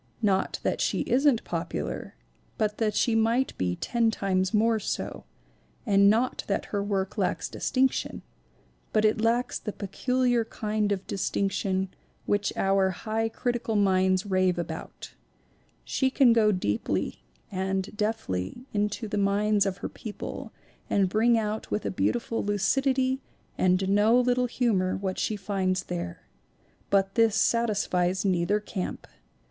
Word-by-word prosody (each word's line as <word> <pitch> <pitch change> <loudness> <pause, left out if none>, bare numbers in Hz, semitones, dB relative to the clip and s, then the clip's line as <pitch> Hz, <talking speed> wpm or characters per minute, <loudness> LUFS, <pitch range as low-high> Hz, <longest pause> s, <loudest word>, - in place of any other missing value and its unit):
Not 195 -2 +1
that - - 0
she - - +1
isn't 265 -2 +2
popular, - - -4 0.4
but 210 -2 -1
that 215 -2 +1
she 235 - +2
might 230 +4 +2
be 90 -1 0
ten 235 - +1
times 190 -3 0
more 220 +1 +3
so; - - -4 0.6
and 200 -2 +5
not 235 +4 +1
that 200 - -1
her 200 - +1
work 195 -1 -2
lacks - - 0
distinction, 265 0 0 0.7
but 215 0 +3
it 215 0 +2
lacks 235 +2 +1
the 210 - -4
peculiar 245 +4 0
kind 215 -2 -2
of 195 -2 -2
dis 195 - -2
tinction 190 -1 -1 0.4
which 205 0 +1
our 195 0 +3
high 220 +4 -2
critical 235 -1 -2
minds 190 -1 +3
rave 185 -2 +2
about 165 -2 -6 0.7
She 265 - 0
can 260 -3 +5
go 215 -2 +4
deeply 105 - -1 0.3
and 190 +1 -2
deftly 210 - -3
into 210 +2 -1
the 210 - -2
minds 200 +1 +2
of 190 -1 -2
her - - -2
people 215 -3 -7 0.4
and 195 -2 +2
bring 230 +4 +3
out 215 0 -2
with 210 - -2
a - - -1
beautiful 230 +4 -1
lucidity 260 +6 +1 0.3
and 185 +1 +2
no 210 +5 +4
little 250 0 +2
humor 210 -7 +1
what 190 -1 -3
she 215 - 0
finds 190 -2 -1
there. 85 - -5 0.7
But 195 -1 +2
this 225 -2 +3
satis 220 -2 +2
fies 180 +2 0
neither 185 +2 +2
camp. 205 -3 -5
210 Hz, 140 wpm, -27 LUFS, 190-230 Hz, 0.7 s, and